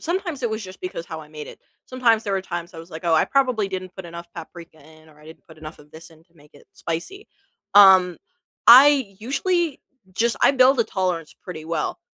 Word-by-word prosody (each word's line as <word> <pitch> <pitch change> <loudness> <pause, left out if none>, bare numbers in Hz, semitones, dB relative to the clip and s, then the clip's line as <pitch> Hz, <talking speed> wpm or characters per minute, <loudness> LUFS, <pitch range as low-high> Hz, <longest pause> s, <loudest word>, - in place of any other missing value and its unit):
sometimes 345 -4 -4
it 235 - -1
was 220 -1 -5
just 185 0 -12
because 180 -2 -6
how 160 -1 -8
I 150 - -14
made 150 -1 -10
it, - - -13 0.3
sometimes 235 -3 +1
there 200 - -3
were 190 -1 -1
times 175 -1 -7
I - - -10
was, 165 +2 -12
like, 160 +2 -10
"Oh, 170 -1 +2
I 160 - +3
probably 255 -7 0
didn't 185 -1 -7
put 190 - -9
enough 170 0 -10
paprika 170 -1 -12
in 155 +2 -19
or 150 -1 -21
I - - -19
didn't 160 - -15
put 160 -1 -17
enough 155 0 -11
of 150 0 -19
this 160 +2 -12
in 160 0 -21
to 170 -1 -38
make 150 -2 -22
it - - -19
spicy." 350 - -7 0.5
Um, 190 -3 +6 0.5
I 260 -3 +7
usually 320 - -1 0.3
just 230 +5 0
I - - +6
build 260 -1 +3
a - - +2
tolerance 180 -6 -3
pretty 160 -4 -9
well, 160 -1 -4
185 Hz, 225 wpm, -22 LUFS, 160-235 Hz, 0.5 s, I